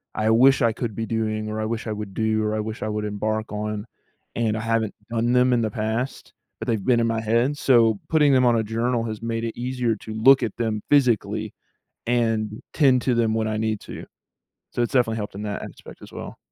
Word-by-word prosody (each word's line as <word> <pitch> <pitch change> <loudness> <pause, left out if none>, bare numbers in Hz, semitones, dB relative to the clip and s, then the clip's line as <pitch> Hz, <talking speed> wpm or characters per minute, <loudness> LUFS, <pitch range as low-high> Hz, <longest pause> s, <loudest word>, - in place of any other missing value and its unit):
I 110 0 +1
wish 130 +5 +5
I 115 -2 +3
could 115 -3 -4
be 115 - -2
doing 110 -1 -2
or 110 0 -3
I - - -1
wish 115 +1 -3
I - - -2
would 105 -2 -6
do 110 0 0
or 105 0 -1
I 110 - -1
wish 110 +1 -4
I 110 - -2
would 105 0 -2
embark 110 +1 -2
on, 105 0 -3 0.5
and 110 -2 0
I 110 - -2
haven't 115 -2 0 0.2
done 120 +1 0
them 125 0 +4
in 120 - +2
the 110 -2 -1
past, 110 +5 -3 0.3
but - - -6
they've 110 -4 0
been 120 -2 +3
in 115 - +2
my 115 -1 -1
head. 120 +6 +1
So 115 -6 +4
putting 150 -3 +4
them 130 -1 +4
on 120 - +4
a 110 - +1
journal 115 +2 -1
has 110 -1 -5
made 115 0 -2
it 115 0 -4
easier 125 -2 -1
to 110 - -8
look 130 +5 +5
at 110 - -3
them 110 -3 -1
physically 125 -7 +2 0.5
and 115 -3 0
tend 130 -5 +4
to 125 - +1
them 115 -2 +1
when 110 -1 0
I 110 0 -2
need 110 -1 -1
to. - - -9 0.7
So 120 - -2
it's 120 - -1
definitely 120 -4 +2
helped 105 -2 -5
in 105 - -6
that 105 -1 -4
aspect - - -11
as - - -12
well. - - -8
115 Hz, 235 wpm, -23 LUFS, 110-120 Hz, 0.7 s, wish